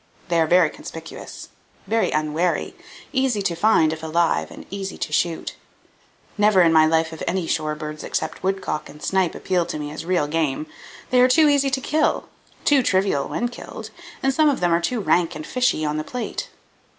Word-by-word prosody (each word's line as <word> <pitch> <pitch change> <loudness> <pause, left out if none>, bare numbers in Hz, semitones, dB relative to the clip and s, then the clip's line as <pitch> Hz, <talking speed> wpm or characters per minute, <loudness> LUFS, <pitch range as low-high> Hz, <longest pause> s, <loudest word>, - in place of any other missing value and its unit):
They 170 -1 +3
are 160 - +2
very 170 -2 +4
conspicuous, 165 0 -9 0.4
very 225 +3 +1
unwary, 155 +3 0 0.4
easy 260 -6 +1
to 175 -3 0
find 165 -4 +3
if 160 - -7
alive, 165 +1 +1
and - - -11
easy 195 -1 -5
to 150 - -4
shoot. 165 +2 0 0.9
Never 205 -3 +5
in 165 -1 +4
my 155 0 +6
life 160 0 +2
have 160 -1 -10
any 185 -2 0
shore 155 -2 -1
birds 150 0 -7
except - - -3
woodcock 190 -5 -2
and 150 - -13
snipe 190 -3 +1
appealed 180 -3 -1
to - - -3
me 150 -1 -5
as 155 - -6
real 175 -3 +1
game. 150 -1 -1 0.5
They 250 0 +5
are 250 - +7
too 310 +4 +5
easy 280 -1 +3
to 265 0 -1
kill, 310 +4 0 0.4
too 285 -2 +5
trivial 190 - +1
when 240 - -1
killed, 240 - -9 0.3
and 270 0 +2
some 310 +2 +4
of 280 - 0
them 175 -1 +2
are 170 - +2
too 225 +7 -1
rank 175 -3 +2
and 155 0 -6
fishy 250 -11 +1
on 150 0 -1
the 155 - -2
plate. 250 +8 -5
175 Hz, 195 wpm, -22 LUFS, 155-220 Hz, 0.9 s, are